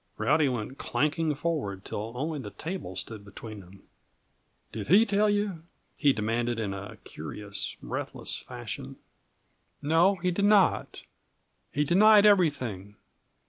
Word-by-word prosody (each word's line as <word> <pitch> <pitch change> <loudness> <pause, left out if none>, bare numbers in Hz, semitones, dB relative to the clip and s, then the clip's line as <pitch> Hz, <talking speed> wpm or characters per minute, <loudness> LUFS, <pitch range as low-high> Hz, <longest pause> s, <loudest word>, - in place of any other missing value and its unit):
Rowdy 150 -1 +3
went 125 +2 -4
clanking 150 +1 0
forward 140 - -3
till 110 +3 -5
only 150 +4 -2
the 105 - -6
table 160 - -6
stood 105 +3 -6
between. 100 -2 -11 0.9
"Did 105 -2 -6
he 200 - +6
tell 205 +1 +2
you?" 205 -5 0 0.3
he 145 -2 +4
demanded, 115 +1 -1
in 100 -3 -2
a 100 +1 -8
curious, 105 -1 -6
breathless - - -4
fashion. - - -7 0.8
"No, 165 +6 +3
he 180 0 -1
did 200 +3 +1
not. 205 -2 +3 0.7
He 145 - +1
denied 205 +6 +6
everything. 130 - +2
145 Hz, 125 wpm, -28 LUFS, -, 0.9 s, he